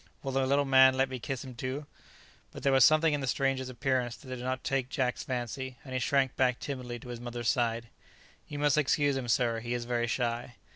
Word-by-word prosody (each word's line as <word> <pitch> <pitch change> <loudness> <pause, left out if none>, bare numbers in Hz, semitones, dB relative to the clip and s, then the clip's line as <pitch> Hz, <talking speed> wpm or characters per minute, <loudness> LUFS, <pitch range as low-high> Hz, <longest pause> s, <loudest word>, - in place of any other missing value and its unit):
Will 135 - -3
the 135 0 +1
little 140 +1 +2
man 130 -1 +6
let 135 0 +2
me 130 -1 -5
kiss 125 +3 -4
him 130 -2 -9
too?" 130 +4 -4 0.7
But - - -10
there 140 - +3
was 135 -1 +6
something 155 0 +5
in 145 - -1
the 135 - -3
stranger's 135 0 0
appearance 130 -2 -1
that 130 - -14
did - - -8
not 130 0 -2
take 135 -2 -1
Jack's 130 -2 -1
fancy, 130 +1 -4
and 130 - -8
he 130 - 0
shrank 135 0 +1
back 125 -2 +2
timidly 125 -4 -5
to 125 - -12
his 120 -1 -6
mother's 120 -1 -3
side. 115 -2 0 0.6
"You 145 - -6
must 145 0 +3
excuse 145 -1 +2
him, 130 -2 -3
sir; 115 -1 +1
he 120 +1 -3
is 120 -1 -4
very 120 -1 0
shy." 120 0 -2
130 Hz, 230 wpm, -30 LUFS, 120-135 Hz, 0.7 s, man